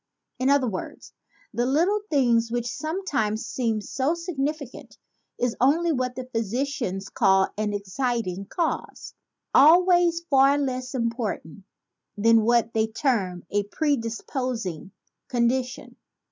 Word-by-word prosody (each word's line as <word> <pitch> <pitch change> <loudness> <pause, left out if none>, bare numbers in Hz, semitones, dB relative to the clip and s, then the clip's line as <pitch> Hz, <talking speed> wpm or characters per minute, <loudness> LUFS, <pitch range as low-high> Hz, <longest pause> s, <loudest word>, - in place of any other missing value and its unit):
In 260 +1 +2
other 280 -2 +3
words, 190 -5 -6 0.4
the 240 +1 0
little 350 +10 +2
thing 245 -6 +3
which 240 0 -2
sometimes 275 - -2
seems 225 -4 -2
so 275 +5 0
significant 305 -5 -5 0.4
is 245 -1 -1
only 325 +6 +3
what 250 -3 -1
the 255 - -5
physicians 230 -3 -2
call 190 -3 +3
an 210 0 -1
exciting 200 -1 -2
cause, 335 -2 -3 0.4
always 345 +2 +5
far 275 -3 +4
less 255 -2 -3
important 230 - -3 0.5
than 225 +2 +5
what 230 0 +2
they 220 0 +1
term 215 - -1
a 205 - +2
predisposing 230 - -2 0.4
condition. 250 +1 -1
250 Hz, 115 wpm, -25 LUFS, 220-280 Hz, 0.5 s, always